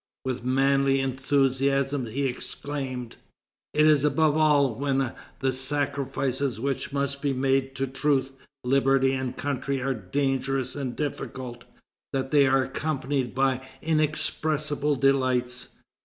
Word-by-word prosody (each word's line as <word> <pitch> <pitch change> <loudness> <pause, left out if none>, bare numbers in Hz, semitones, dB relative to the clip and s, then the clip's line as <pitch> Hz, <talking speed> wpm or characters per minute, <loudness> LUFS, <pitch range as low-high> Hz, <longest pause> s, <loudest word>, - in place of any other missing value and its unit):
With 130 -2 -3
manly 135 +1 +3
enthusiasm 135 0 +1
he 135 +6 -2
exclaimed: 130 -1 -5 0.6
"It 150 0 +5
is 150 -2 +5
above 150 +1 +3
all 145 -5 +4
when 135 +1 0 0.3
the 130 -1 +1
sacrifices 135 -2 0
which 135 +2 -2
must 140 0 -2
be 140 -1 0
made 135 0 +1
to 135 - 0
truth, 135 0 0 0.3
liberty, 135 +1 +3
and 130 -1 -3
country 140 -1 -2
are 135 +1 0
dangerous 135 +4 -1
and 135 -4 -4
difficult, 130 -4 -5 0.5
that 135 -1 -2
they 145 -2 +5
are 135 0 +3
accompanied 135 -2 -2
by 130 -1 +1 0.2
inexpressible 150 -1 0
delights. 130 -2 +1
135 Hz, 120 wpm, -26 LUFS, 130-140 Hz, 0.6 s, It